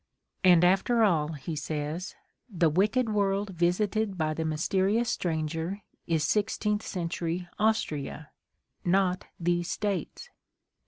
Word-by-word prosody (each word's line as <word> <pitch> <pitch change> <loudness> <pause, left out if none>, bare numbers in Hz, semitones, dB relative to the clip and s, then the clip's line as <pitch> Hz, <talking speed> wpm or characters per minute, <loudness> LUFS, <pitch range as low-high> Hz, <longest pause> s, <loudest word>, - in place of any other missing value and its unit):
' - - -55
' - - -46
And, 175 -2 +6
after 195 +6 +4
all, 160 -6 +2
he 155 +2 -5
says, 150 +4 -4 0.3
"the 170 -6 +2
wicked 215 +8 +2
world 200 -1 0
visited 190 +4 0
by 155 -2 0
the 160 - -2
mysterious 190 +8 +1
stranger 165 +3 -2 0.2
is 160 -3 +1
sixteenth 210 +1 0
century 175 -1 -3
Austria 160 -8 -1 0.3
— - - -49
not 185 -2 0
these 175 0 0
States." 210 - -3
180 Hz, 125 wpm, -28 LUFS, 160-205 Hz, 0.3 s, And